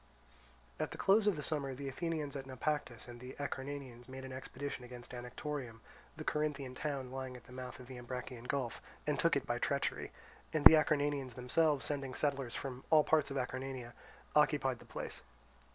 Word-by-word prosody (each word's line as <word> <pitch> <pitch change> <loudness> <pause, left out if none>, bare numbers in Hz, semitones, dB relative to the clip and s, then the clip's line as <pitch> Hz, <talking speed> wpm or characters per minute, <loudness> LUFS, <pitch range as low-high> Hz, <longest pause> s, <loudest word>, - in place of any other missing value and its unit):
At - - 0
the - - -7
close 205 +2 +5
of 205 - +5
the 150 - -4
summer, 140 -3 -1
the 140 +1 -5
Athenians 150 0 -2
at 135 -1 -4
Naupactus 130 -2 -2
and 120 0 -8
the 125 +1 -8
Acarnanians 135 -3 -4
made 130 0 -6
an 130 - -6
expedition 135 0 -5
against 125 0 -9
Anactorium, 125 0 -4 0.4
the 155 - -4
Corinthian 150 -4 0
town 135 -2 -3
lying 130 -1 -4
at 120 - -14
the - - -16
mouth 125 0 -6
of 125 - -9
the 125 0 -8
Ambracian 125 0 -5
Gulf, 130 -4 -1 0.2
and - - +1
took - - +4
it - - +1
by - - 0
treachery; - - 0 0.4
and 155 -2 +1
the - - +14
Acarnanians 145 -4 +3
themselves, 140 +3 +3
sending 135 -3 -1
settlers 135 -4 0
from 130 -1 -4
all 155 -1 +7
parts 155 -1 +3
of 140 - -2
Acarnania, 130 -1 -3 0.4
occupied 145 -4 +4
the - - -13
place. - - -5
135 Hz, 185 wpm, -36 LUFS, 125-145 Hz, 0.4 s, the